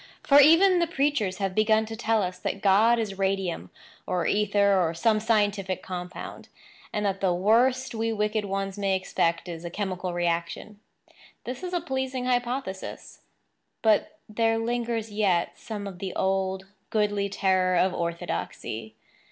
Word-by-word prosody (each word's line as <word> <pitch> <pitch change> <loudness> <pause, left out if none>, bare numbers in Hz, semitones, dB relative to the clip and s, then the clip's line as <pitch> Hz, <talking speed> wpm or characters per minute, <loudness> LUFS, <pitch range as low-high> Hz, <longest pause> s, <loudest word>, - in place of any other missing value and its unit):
For, 285 0 +6
even 345 +6 +6
the 340 - +2
preachers 275 - 0
have 195 -2 -2
begun 215 +1 +3
to 225 +1 -7
tell 220 -1 +1
us 180 0 -4
that 195 - -4
God 215 +4 +5
is 205 -4 -3
radium, 190 - -1 0.4
or 180 -2 -1
ether 200 -2 +3
or 165 -1 0
some 215 +5 +2
scientific 205 -4 0
compound, 180 -1 -7 0.4
and 210 0 -2
that 195 -1 -1
the 185 -3 +2
worst 245 +8 +2
we 225 0 -1
wicked 210 0 0
ones 195 0 -3
may 195 -1 +1
expect 170 -2 -1
is 170 -1 -7
a 170 - -4
chemical 185 -1 -3
reaction. 175 +4 -2 0.6
This 250 +5 -6
is 365 -1 -5
a 350 -1 -1
pleasing 265 -4 -3
hypothesis; 245 -5 -3 0.6
but 220 +7 +2
there 225 +1 +1
lingers 230 -1 -2
yet 190 -5 +1
some 210 -2 -6
of 190 -3 -8
the 190 -1 -5
old, 190 0 0 0.2
goodly 205 -2 0
terror 185 -2 +1
of 185 +1 +2
orthodoxy. 115 -10 -4
205 Hz, 150 wpm, -26 LUFS, 185-225 Hz, 0.6 s, For